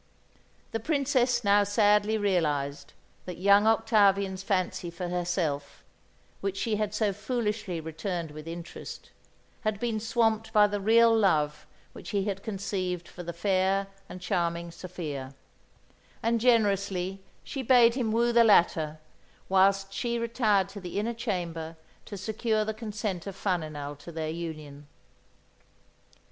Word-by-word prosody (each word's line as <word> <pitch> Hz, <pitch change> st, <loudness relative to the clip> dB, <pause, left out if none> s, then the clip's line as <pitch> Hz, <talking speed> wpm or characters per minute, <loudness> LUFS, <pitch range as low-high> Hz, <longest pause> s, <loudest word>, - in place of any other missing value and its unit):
The 225 Hz, -, -2 dB
Princess 255 Hz, -2 st, +1 dB
now 205 Hz, 0 st, +5 dB
sadly 210 Hz, +1 st, +3 dB
realised 145 Hz, -8 st, -1 dB, 0.3 s
that 180 Hz, -, -6 dB
young 200 Hz, +3 st, +5 dB
Octavian's 200 Hz, -4 st, +3 dB
fancy 185 Hz, -3 st, -1 dB
for 175 Hz, +1 st, -5 dB
herself 175 Hz, -5 st, -2 dB, 0.6 s
which 195 Hz, 0 st, -3 dB
she 215 Hz, +1 st, 0 dB
had 210 Hz, 0 st, -2 dB
so 210 Hz, -2 st, +1 dB
foolishly 210 Hz, -4 st, -2 dB
returned 160 Hz, +1 st, -4 dB
with 155 Hz, +1 st, -10 dB
interest 170 Hz, 0 st, -8 dB, 0.5 s
had 215 Hz, -2 st, -1 dB
been 230 Hz, -2 st, -1 dB
swamped 225 Hz, 0 st, 0 dB
by 210 Hz, -2 st, +6 dB
the 205 Hz, -1 st, -2 dB
real 230 Hz, +2 st, +5 dB
love 150 Hz, -8 st, +1 dB, 0.3 s
which -, -, -10 dB
he 200 Hz, -2 st, 0 dB
had 195 Hz, -2 st, -3 dB
conceived 190 Hz, -4 st, -3 dB
for 180 Hz, -, -10 dB
the 170 Hz, 0 st, -5 dB
fair 190 Hz, +2 st, +1 dB, 0.2 s
and 185 Hz, -, -9 dB
charming 170 Hz, -1 st, -1 dB
Sophia; 150 Hz, -7 st, -6 dB, 0.9 s
and, 230 Hz, 0 st, +1 dB
generously, 200 Hz, -5 st, +1 dB, 0.2 s
she 275 Hz, -, -5 dB
bade 240 Hz, -2 st, +5 dB
him 240 Hz, -4 st, -1 dB
woo 235 Hz, +2 st, +2 dB
the 235 Hz, 0 st, +6 dB
latter, 165 Hz, -7 st, +3 dB, 0.5 s
whilst 195 Hz, +1 st, +3 dB
she 235 Hz, +3 st, -1 dB
retired 220 Hz, -4 st, +1 dB
to 200 Hz, 0 st, -9 dB
the 180 Hz, 0 st, -6 dB
inner 225 Hz, +3 st, -1 dB
chamber 170 Hz, -8 st, -4 dB, 0.3 s
to 205 Hz, -, -7 dB
secure 215 Hz, +2 st, -1 dB
the 220 Hz, -, -2 dB
consent 210 Hz, -4 st, -4 dB
of 195 Hz, -, -6 dB
Faninal 155 Hz, -7 st, -3 dB
to 170 Hz, -, -10 dB
their 160 Hz, -1 st, -3 dB
union. 155 Hz, -4 st, -7 dB
195 Hz, 135 wpm, -28 LUFS, 170-220 Hz, 0.9 s, by